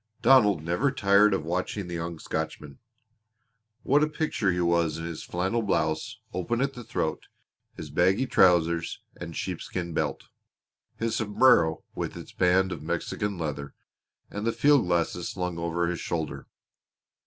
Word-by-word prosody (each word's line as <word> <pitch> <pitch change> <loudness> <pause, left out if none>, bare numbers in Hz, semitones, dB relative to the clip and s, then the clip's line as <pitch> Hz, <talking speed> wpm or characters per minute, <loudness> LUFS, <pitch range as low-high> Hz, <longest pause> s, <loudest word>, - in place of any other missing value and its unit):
Donald 105 - +5
never 90 - +1
tired 100 -2 +4
of 95 -5 -1
watching 90 +3 -2
the 90 - -7
young 85 0 -4
Scotchman. 75 -2 -5 1.0
What 145 +3 +3
a 150 - +2
picture 150 - 0
he 90 - -1
was 85 -2 +1
in 80 - -5
his 85 -2 -5
flannel 95 +6 -1
blouse, 80 -7 -1 0.2
open 95 +6 -1
at 135 +1 0
the 125 - -9
throat; 80 -7 -3 0.5
his 75 -2 -8
baggy 95 - +3
trousers 85 -6 +3
and 85 -2 -7
sheepskin 90 -1 -4
belt; - - -2 0.7
his 115 0 -1
sombrero 105 -7 +3
with - - -4
its - - -10
band 95 +1 +2
of - - -5
Mexican 85 +5 -3
leather; 70 -3 -4 0.6
and 105 +2 -3
the - - +3
field 145 -8 +4
glasses 85 0 0
slung 90 -2 -3
over 85 +1 -1
his 85 -1 -2
shoulder! 80 -3 -4
90 Hz, 150 wpm, -27 LUFS, 85-105 Hz, 1.0 s, Donald